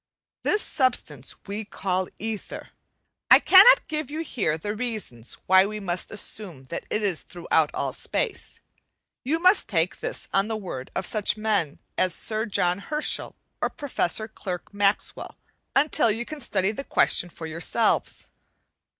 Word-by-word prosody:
This 420 - +1
substance 200 - 0
we 205 +2 -4
call 185 -2 -2
"ether." 220 -1 -6 0.6
I - - +10
cannot 395 +6 +7
give 305 -3 -3
you 310 +2 -4
here 200 - -1
the 205 +6 -4
reasons 215 - -4
why 190 +1 +6
we 215 0 -5
must 180 -3 -3
assume 200 -8 -1
that - - -4
it 215 - -1
is 190 -6 +1
throughout 160 -3 0
all - - -2
space; - - -3 0.6
you 295 +6 +1
must 365 - +4
take 175 -2 0
this - - -3
on 195 +1 +2
the 220 -1 -2
word 155 -11 -7
of - - -2
such 210 -1 +1
men 205 -9 0 0.2
as 185 -2 +2
Sir 220 +1 -2
John 180 -3 +1
Herschel 300 +9 -1 0.3
or - - +1
Professor 220 - -2
Clerk 190 -3 -7
Maxwell, 200 0 -1 0.4
until 275 -4 +4
you 225 +3 -1
can 305 +3 -8
study 195 -4 +1
the 250 +6 -6
question 175 - +2
for 165 - -9
yourselves. 170 +8 0
210 Hz, 150 wpm, -25 LUFS, 180-240 Hz, 0.6 s, I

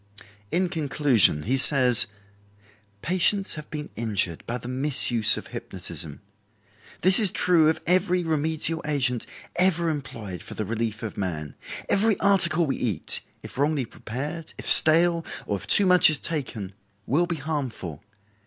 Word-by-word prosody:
In 180 +2 0
conclusion 140 - 0
he 130 +7 +1
says: 130 -4 +8 1.0
"Patients 185 +3 +1
have 150 -1 -10
been 150 -1 -8
injured 105 -7 -3
by 120 - -3
the 120 - -11
misuse 125 -4 +2
of - - -10
hypnotism. 75 -3 -7 0.8
This 185 +4 +6
is 205 -5 +4
true 165 -4 +2
of 160 - -2
every 180 0 0
remedial 160 +1 -2
agent 130 -6 -2 0.3
ever 175 -2 +1
employed 115 - -8
for - - -11
the 110 - -5
relief 115 +1 -5
of 110 - -7
man. 80 -7 -5 0.3
Every 210 +1 0
article 175 -4 +2
we 135 - -3
eat, 105 -10 -3 0.2
if - - -10
wrongly 145 -2 -1
prepared, 145 +10 -8
if - - -9
stale, 165 +1 +5 0.2
or 100 - -3
if - - -12
too 205 - +5
much 180 -3 +5
is 155 - 0
taken, 125 - -5 0.3
will 165 +7 0
be 170 - -3
harmful. 130 - -6
150 Hz, 145 wpm, -23 LUFS, 115-170 Hz, 1.0 s, says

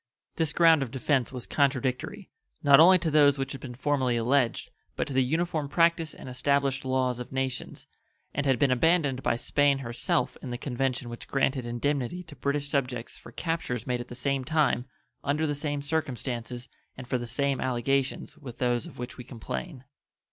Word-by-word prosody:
This 160 -2 +1
ground 165 -2 +5
of 135 - -2
defense 130 0 0
was 125 -2 -6
contradictory, 140 +7 -1 0.3
not 140 -1 +7
only 185 +3 +8
to 170 -3 -1
those 145 -2 +5
which 135 0 -3
had 135 - -7
been 125 -2 -7
formerly 130 -3 +1
alleged, 120 0 +1 0.2
but - - -1
to 145 - -6
the 130 0 +4
uniform 160 +1 -1
practice 165 -1 +2
and - - -10
established 135 +1 +1
laws 130 -2 0
of 125 - -7
nations, 130 -1 -3 0.5
and 145 0 -1
had 135 -2 +3
been 140 -3 +3
abandoned 140 -1 +2
by - - +1
Spain 140 +3 +2
herself 120 -3 -1
in 130 - -6
the 120 - -3
convention 130 -1 -2
which 120 0 -8
granted 135 -2 0
indemnity 140 +7 -1
to 160 -4 -12
British 145 0 -1
subjects 125 -5 -2
for - - -13
captures 145 -6 -3
made 125 -1 -1
at 120 - -8
the 120 - -9
same 135 +1 -1
time, 145 -4 +1 0.4
under 150 +3 +1
the 145 - 0
same 145 -1 -3
circumstances, 125 -5 -3 0.3
and 125 -1 -8
for 125 - 0
the 120 - -5
same 135 +3 0
allegations 130 +2 -1
with 130 -6 -9
those 120 -2 0
of - - -13
which 125 0 -6
we - - -6
complain. 130 +4 -6
135 Hz, 185 wpm, -28 LUFS, 125-145 Hz, 0.5 s, only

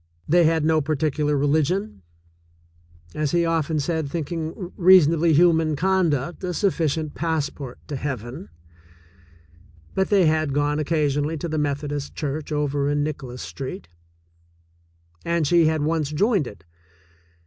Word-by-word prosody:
They 175 +2 +4
had 160 -1 +2
no 160 0 +3
particular 150 0 0
religion, 155 - 0 1.1
as 150 0 -2
he 170 -1 +3
often 160 -2 0
said, 160 0 -2
thinking 165 +3 -4
reasonably 170 -3 +5
human 160 -1 +4
conduct 175 -3 0
a 180 -1 -2
sufficient 160 -6 0
passport 150 -5 -3
to 145 - -4
heaven, 130 -3 -5 1.4
but 190 - 0
they 195 -4 +4
had 155 -2 +1
gone 145 +1 0
oc 150 - -3
casionally 150 -1 0
to 170 - -3
the 155 -1 -2
Methodist 145 0 -3
Church 150 +1 -4
over 145 -1 0
in 145 0 +1
Nicholas 130 -5 -5
Street, 130 -10 -7 1.3
and 170 -2 0
she 170 +1 +4
had 155 -1 0
once 155 -2 0
joined 190 - +1
it. 100 - -12
155 Hz, 130 wpm, -23 LUFS, 145-165 Hz, 1.4 s, reasonably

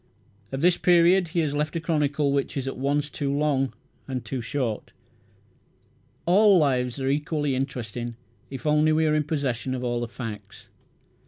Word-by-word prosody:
Of 135 0 -3
this 175 +1 +4
period 175 +1 +5
he 170 +1 0
has 150 -3 -1
left 150 +2 -1
a - - 0
chronicle 150 -3 0
which 140 +2 -1
is 135 -1 -2
at 135 - -3
once 140 +2 0
too 140 -1 -3
long 140 -2 +1 0.4
and 130 -3 -4
too 130 +3 -3
short. 120 -3 -3 1.3
All 200 +2 +6
lives 130 -5 +1
are 135 - -2
equally 145 0 0
interesting 120 -3 -4 0.3
if 135 +1 -8
only 150 +1 +3
we 160 +1 +3
are 155 - +2
in 155 -1 +1
possession 135 -4 -2
of 125 - -4
all 120 -1 -1
the 120 - -3
facts. 105 -4 -8
140 Hz, 170 wpm, -25 LUFS, 130-155 Hz, 1.3 s, All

